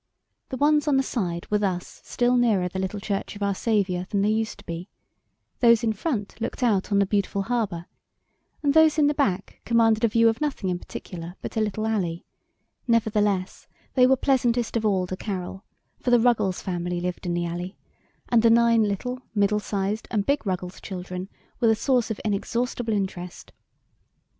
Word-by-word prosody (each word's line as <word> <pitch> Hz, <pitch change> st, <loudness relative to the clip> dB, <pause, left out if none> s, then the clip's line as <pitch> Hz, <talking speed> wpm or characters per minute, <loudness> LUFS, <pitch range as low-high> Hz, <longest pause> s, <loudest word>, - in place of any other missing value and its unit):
The 260 Hz, -, -4 dB
ones 295 Hz, +1 st, +3 dB
on 285 Hz, -2 st, +3 dB
the 270 Hz, -, +3 dB
side 175 Hz, -10 st, -3 dB
were 210 Hz, -, +3 dB
thus 185 Hz, -3 st, -3 dB
still 245 Hz, 0 st, +1 dB
nearer 220 Hz, -7 st, +3 dB
the 190 Hz, +1 st, -5 dB
little 190 Hz, +2 st, -3 dB
Church 200 Hz, 0 st, -3 dB
of 205 Hz, -, -5 dB
our 200 Hz, 0 st, +1 dB
Saviour 190 Hz, -4 st, 0 dB
than 200 Hz, -1 st, +1 dB
they 210 Hz, -, +3 dB
used 220 Hz, 0 st, -1 dB
to 200 Hz, -, -16 dB
be; 170 Hz, +2 st, -6 dB, 0.7 s
those 235 Hz, -2 st, +5 dB
in 225 Hz, -1 st, +1 dB
front 215 Hz, -3 st, -3 dB
looked 250 Hz, -, -3 dB
out 210 Hz, -4 st, +1 dB
on 200 Hz, -, +3 dB
the 200 Hz, -, +4 dB
beautiful 200 Hz, 0 st, 0 dB
harbor, 205 Hz, -7 st, -2 dB, 0.8 s
and 285 Hz, -1 st, +3 dB
those 320 Hz, 0 st, +5 dB
in 300 Hz, -, +4 dB
the 295 Hz, -, +3 dB
back 200 Hz, -10 st, -1 dB
commanded 225 Hz, -1 st, +3 dB
a -, -, +6 dB
view 230 Hz, +1 st, +4 dB
of 225 Hz, +3 st, +1 dB
nothing 270 Hz, -11 st, -1 dB
in 175 Hz, -, -2 dB
particular 175 Hz, -1 st, -8 dB
but -, -, -6 dB
a 220 Hz, -, +1 dB
little 215 Hz, 0 st, -1 dB
alley 185 Hz, -7 st, -1 dB, 0.6 s
nevertheless, 210 Hz, -5 st, +1 dB, 0.3 s
they 250 Hz, -1 st, +5 dB
were 265 Hz, -, +5 dB
pleasantest 245 Hz, -4 st, +1 dB
of 220 Hz, -1 st, +1 dB
all 190 Hz, -3 st, +1 dB
to 185 Hz, -, -4 dB
Carol, 190 Hz, 0 st, -5 dB, 0.4 s
for -, -, -2 dB
the 245 Hz, -1 st, +6 dB
Ruggles 215 Hz, -6 st, +1 dB
family 175 Hz, -1 st, -2 dB
lived 180 Hz, +1 st, -4 dB
in 175 Hz, -, 0 dB
the 175 Hz, 0 st, -1 dB
alley, 175 Hz, +2 st, -5 dB, 0.5 s
and 235 Hz, -2 st, +4 dB
the 230 Hz, -, +5 dB
nine 230 Hz, 0 st, +5 dB
little, 220 Hz, +5 st, -1 dB, 0.2 s
middle 205 Hz, 0 st, +2 dB
sized 205 Hz, +1 st, -2 dB
and 205 Hz, -3 st, 0 dB
big 280 Hz, -4 st, 0 dB
Ruggles 180 Hz, -1 st, -3 dB
children 185 Hz, 0 st, -6 dB, 0.3 s
were 235 Hz, -, +3 dB
the 225 Hz, -, +5 dB
source 245 Hz, 0 st, +1 dB
of 220 Hz, -, -3 dB
inexhaustible 230 Hz, +3 st, -1 dB
interest. 185 Hz, -3 st, -4 dB
210 Hz, 190 wpm, -25 LUFS, 185-235 Hz, 0.8 s, a